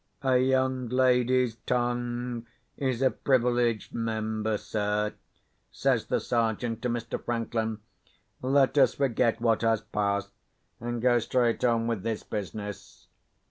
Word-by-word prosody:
"A 130 -1 +3
young 130 -1 +1
lady's 125 -1 +3
tongue 120 -1 -1 0.3
is 130 -2 -1
a 130 - +4
privileged 120 -3 +1
member, 110 -1 -1
sir," 105 0 -1 0.6
says - - +1
the - - +1
Sergeant 115 0 -1
to 125 - -1
Mr. 115 -1 -3
Franklin. 115 -2 -2 0.6
"Let 135 +1 +3
us - - +5
forget 120 -4 +1
what 115 -2 +2
has 115 -2 +2
passed, 100 -1 -1 0.5
and 120 0 -4
go 120 -1 +4
straight 120 0 +1
on 115 -2 +2
with 115 -4 -1
this 110 +1 -3
business. 105 0 -6
120 Hz, 125 wpm, -28 LUFS, 110-125 Hz, 0.6 s, us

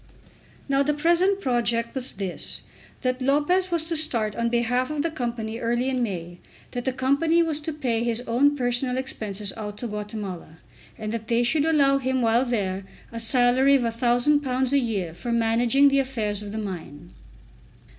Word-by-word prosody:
Now 275 0 +2
the 295 +1 +1
present 345 +6 +2
project 235 -3 0
was 265 -1 -4
this, 195 -2 -4 0.4
that 255 0 -1
Lopez 295 +8 +2
was 335 -2 0
to 330 0 -2
start 235 -9 -1
on 235 0 0
behalf 245 +2 +1
of 300 -1 -2
the 330 - -1
Company 235 -5 -4
early 240 +2 0
in 255 -1 -1
May, 175 -6 -4 0.3
that 245 -1 -4
the 260 - +1
Company 280 +6 +2
was 315 -2 -1
to 310 +1 -4
pay 250 -7 -1
his 235 0 0
own 275 +5 +2
personal 250 0 0
expenses 210 -6 -3
out 210 -2 -6
to 245 - -5
Guatemala, 205 -6 -6 0.4
and 215 -1 -4
that 225 -1 -4
they 235 0 +2
should 290 +5 +2
allow 280 -4 +4
him 260 -1 0
while 230 +3 +3
there 195 -6 -1 0.3
a 230 - -5
salary 250 +3 +4
of 265 - +2
£1000 250 +3 +1
a 280 - +4
year 200 -9 -2
for 205 +8 -5
managing 235 +4 +4
the 275 0 +3
affairs 220 -6 -2
of 205 -1 -7
the 215 - -5
mine. 175 -6 -7
245 Hz, 175 wpm, -25 LUFS, 225-275 Hz, 0.4 s, allow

